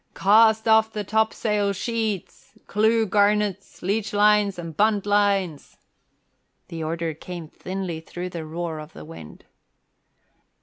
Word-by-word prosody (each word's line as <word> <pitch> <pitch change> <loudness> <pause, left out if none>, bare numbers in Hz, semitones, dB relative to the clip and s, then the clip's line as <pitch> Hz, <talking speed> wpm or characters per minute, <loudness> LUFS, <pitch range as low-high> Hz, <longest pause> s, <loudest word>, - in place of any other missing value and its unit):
"Cast 220 +2 +4
off 220 0 +4
the 210 -1 -4
topsail 210 -1 0
sheets, 220 -2 -4
clew 220 +2 +2
garnets, 205 -1 0
leechlines 205 0 +2
and 165 -2 -7
buntlines!" 205 -5 +1 0.9
The 165 -1 -5
order 165 0 -2
came 170 +1 -8
thinly 185 0 -5
through 175 +2 -7
the 170 -2 -6
roar 160 0 -5
of 155 +1 -10
the 75 - -10
wind. 80 -1 -12
200 Hz, 115 wpm, -24 LUFS, 170-210 Hz, 0.9 s, Cast